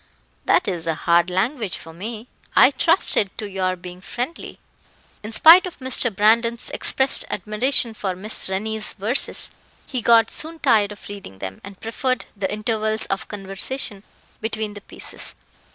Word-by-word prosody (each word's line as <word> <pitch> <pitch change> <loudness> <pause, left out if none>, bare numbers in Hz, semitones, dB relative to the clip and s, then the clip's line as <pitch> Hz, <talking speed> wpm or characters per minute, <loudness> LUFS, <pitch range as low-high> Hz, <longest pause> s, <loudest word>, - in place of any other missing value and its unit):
that - - +3
is 170 -4 -2
hard 170 +2 +2
language 215 +3 -1
for 165 - -12
me. 220 +6 -7 0.3
I - - +7
trusted 325 - +3
to 210 - -4
your 185 -2 -1
being 180 0 -11
friendly." 250 - -6 0.6
In 215 - -7
spite 335 +10 +8
of 360 - -10
Mr. 260 -2 +4
Brandon's 230 +3 +2
expressed 265 0 +2
admiration 230 +2 0
for 195 -4 -3
Miss 205 +1 +1
Rennie's 215 +3 -2
verses, 220 +6 -1 0.3
he 255 -3 -3
got 230 0 +5
soon 325 +1 0
tired 210 -8 +3
of 205 - -11
reading 200 - -9
them, 95 0 -7
and 200 -1 -11
preferred 255 +3 -2
the 195 -2 -2
intervals 215 +1 -1
of 195 - -2
conversation 200 +2 -6 0.4
between 220 -1 -3
the 205 - -10
pieces. - - -7
215 Hz, 150 wpm, -22 LUFS, 195-235 Hz, 0.6 s, spite